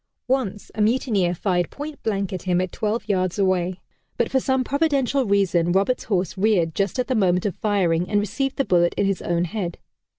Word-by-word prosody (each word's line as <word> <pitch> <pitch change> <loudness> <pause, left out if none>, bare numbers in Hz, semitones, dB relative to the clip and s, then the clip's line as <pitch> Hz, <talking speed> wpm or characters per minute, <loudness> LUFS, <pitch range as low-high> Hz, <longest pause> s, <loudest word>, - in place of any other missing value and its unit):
Once, 250 -6 -1
a 215 - -2
mutineer 210 -6 +1
fired 175 -1 0
point 295 +1 -8
blank 200 -3 -2
at 185 - -4
him 180 -1 +1
at 185 -1 -2
twelve 215 +1 -2
yards 185 -3 0
away, 185 -2 +1 0.4
but - - 0
for 265 - +3
some 260 0 +1
providential 280 -2 +1
reason 180 -4 +2
Roberts' 200 +7 +1
horse 185 -5 -1
reared 190 -5 +2
just 195 0 -1
at 250 - +1
the 260 - -1
moment 185 -5 +2
of 200 - -1
firing 180 -5 +1
and 205 0 +2
received 260 +7 -2
the 275 - 0
bullet 175 -1 +2
in 200 - +1
his 195 -2 0
own 170 0 0
head. 175 -1 -4
200 Hz, 200 wpm, -23 LUFS, 180-235 Hz, 0.4 s, for